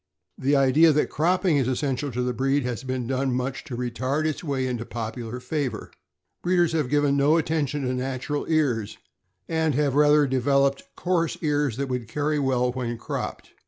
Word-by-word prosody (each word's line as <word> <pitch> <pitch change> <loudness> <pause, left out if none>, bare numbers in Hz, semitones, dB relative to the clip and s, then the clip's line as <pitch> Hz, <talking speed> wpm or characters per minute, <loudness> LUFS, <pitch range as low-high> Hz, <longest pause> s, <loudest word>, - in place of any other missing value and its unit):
The 140 +2 +2
idea 140 +4 +5
that 150 - +1
cropping 175 0 +2
is 130 -3 +1
essential 135 +1 -1
to 125 +2 -1
the 125 0 -1
breed 135 +3 +1
has 125 -2 -3
done 130 0 -1
much 125 +1 -3
to 125 - -6
retard 130 +5 -1
its 155 +1 -2
way 140 -4 -1
into 125 -2 -2
popular 115 +1 -5
favor. 125 -3 -3 0.5
Breeders 175 -1 +2
have 155 -6 0
given 145 -1 +2
no 145 +3 +4
attention 150 -3 -1
to 130 0 -1
natural 130 +3 -3
ears, 130 -10 0 0.5
and 160 -3 0
have 145 -1 +1
rather 150 0 +5
devel 135 +2 +2
oped 140 0 -4
coarse 175 -3 0
ears 145 -5 +1
that 140 0 -2
would 125 -3 -3
carry 150 +5 -1
well 125 -2 +1
when 120 -2 -3
cropped. - - -5
135 Hz, 175 wpm, -25 LUFS, 125-150 Hz, 0.5 s, idea